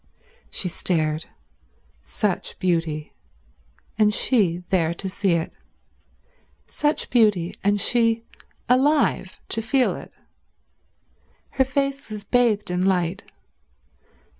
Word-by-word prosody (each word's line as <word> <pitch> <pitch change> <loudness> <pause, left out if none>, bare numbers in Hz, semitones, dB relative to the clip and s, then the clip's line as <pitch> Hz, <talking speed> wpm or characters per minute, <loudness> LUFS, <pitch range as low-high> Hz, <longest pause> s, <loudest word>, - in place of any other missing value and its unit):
She 185 - -2
stared. 160 -3 0 0.8
Such 205 -5 -2
beauty; 165 -4 -1 0.9
and 210 -1 +5
she 190 -7 +2
there 170 -3 +1
to 195 - -5
see 190 -1 0
it. 165 -1 -1 1.1
Such 300 0 -1
beauty; 210 -8 +3
and 205 +1 +2
she 230 0 +2 0.4
alive 260 -6 +2
to 225 - -1
feel 250 +3 +1
it. - - -10 1.4
Her 265 - +2
face 275 0 -2
was 210 -1 -5
bathed 215 -3 +1
in 180 +1 0
light. 180 -3 +1
205 Hz, 100 wpm, -23 LUFS, 175-240 Hz, 1.4 s, and